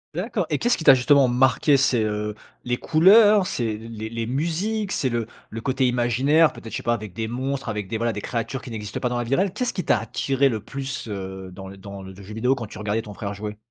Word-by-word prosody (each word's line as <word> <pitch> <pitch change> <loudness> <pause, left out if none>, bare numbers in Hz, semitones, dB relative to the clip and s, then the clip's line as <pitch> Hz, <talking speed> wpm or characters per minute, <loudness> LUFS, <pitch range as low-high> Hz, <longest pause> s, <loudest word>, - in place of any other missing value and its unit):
D'accord, - - -1
et - - +1
qu'est-ce 240 +1 +2
qui 165 - -6
t'a 135 - +9
justement 135 +1 +4
marqué? 130 +3 +3
C'est, 130 -4 +3
heu, 105 0 -2 0.3
les 125 0 0
couleurs? 200 +4 +6
C'est 115 -7 -2
les 110 -1 -7
les 115 -1 -3
musiques? 180 - -1
C'est 130 - 0
le 115 -1 -1 0.2
le 115 - -6
côté 130 +1 +1
imaginaire? 130 +6 +3
Peut-être, 115 - -10
je - - -3
sais - - -7
pas, 120 - +2
avec 105 -5 -5
des 110 +2 -3
monstres, 130 +2 -3
avec 105 -3 -3
des, 110 - -2
voilà, 115 0 0
des 105 - -5
créatures 120 +2 -3
qui - - -9
n'existent 105 -3 -5
pas 125 - 0
dans 120 - -2
la 120 - -1
vie 120 - -2
réelle? 190 0 +1
Qu'est-ce 250 +4 -2
qui 180 - -3
t'a - - +3
attiré 135 +5 +1
le 110 -3 -2
plus, 135 -2 -5
heu, 95 -2 -6
dans 95 +1 -9
l 100 - -12
dans 100 0 -9
le 95 0 -9
jeu 100 +2 -12
vidéo 125 +4 +2
quand 120 -5 -5
tu - - -11
regardais 105 +1 -1
ton 105 -2 -10
frère 100 -1 -4
jouer? 105 +1 -6
120 Hz, 255 wpm, -23 LUFS, 105-135 Hz, 0.3 s, t'a